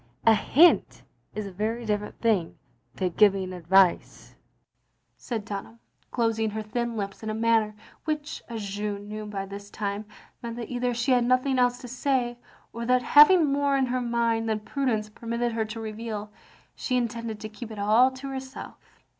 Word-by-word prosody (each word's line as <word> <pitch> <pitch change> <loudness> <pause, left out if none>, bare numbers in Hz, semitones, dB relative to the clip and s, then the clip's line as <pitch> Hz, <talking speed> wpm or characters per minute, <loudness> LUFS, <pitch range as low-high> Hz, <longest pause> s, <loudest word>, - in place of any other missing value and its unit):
A 225 - +7
hint 315 +10 +4 0.3
is 215 -1 -3
a 195 - -7
very 220 +5 -3
different 210 -1 -2
thing 210 -8 +1 0.4
to 185 - 0
giving 190 0 +3
advice, 180 +1 +2 0.4
" - - -47
said 225 -5 -5
Dun 200 -2 -4
ham, 115 +1 -18 0.3
closing 225 -2 0
her 215 +1 -4
thin 235 +2 -3
lips 200 -1 -4
in 220 - -4
a 215 - -2
manner 225 -1 +2 0.3
which, 305 -1 -3
as 225 -3 -5
Jeanne 205 0 -4
knew 215 0 -6
by 195 -2 -4
this 200 +1 -9
time, 205 0 -4 0.4
meant 235 -1 -5
that 235 -1 -6
either 245 0 -1
she 240 +3 0
had 250 -1 +4
nothing 255 +1 +2
else 245 0 +3
to 250 - -8
say, 250 -1 -1 0.3
or 235 - -5
that, 250 0 +3
having 310 +5 +7
more 280 -1 +2
in 265 - +2
her 255 0 -1
mind 230 -1 0
than 215 -1 -1
prudence 220 -2 -1
permitted 235 +2 -3
her 225 -1 -1
to 215 +1 -7
reveal, 215 -1 -5 0.4
she 255 - -1
intended 230 -2 -3
to 215 - -6
keep 220 +2 -9
it 220 - -8
aU 215 +5 +5
to 265 +1 -8
herself. 265 -1 -7
225 Hz, 180 wpm, -26 LUFS, 210-245 Hz, 0.4 s, A